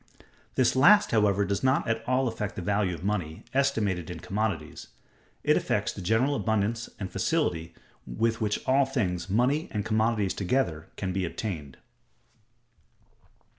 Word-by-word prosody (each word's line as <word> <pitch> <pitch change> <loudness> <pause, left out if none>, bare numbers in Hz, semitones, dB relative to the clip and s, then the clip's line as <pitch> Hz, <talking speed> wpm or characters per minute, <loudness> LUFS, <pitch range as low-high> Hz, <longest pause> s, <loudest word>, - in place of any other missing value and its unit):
This 130 -1 +3
last, 205 +11 +6
however, 105 -2 +3
does 100 +3 -2
not 130 +1 +2
at 115 0 -1
all 130 +1 +2
affect 105 -3 -4
the 95 - -5
value 100 -2 0
of 85 - -11
money, 90 -6 -2
estimated 110 - 0
in 85 -2 -6
commodities; 95 -5 -3 0.6
it - - +4
affects - - 0
the - - -8
general 110 +10 +2
abundance 110 -1 -1
and 95 -3 -5
facility 90 - -1 0.3
with 115 0 -1
which 105 -1 -1
all 135 +1 +3
things, 95 -10 -2
money 125 +9 +2
and 105 -1 -3
commodities 110 -2 +1
together, 90 - -1
can 95 -2 -3
be 95 0 -1
obtained. 85 -6 -5
105 Hz, 145 wpm, -27 LUFS, 95-125 Hz, 0.6 s, last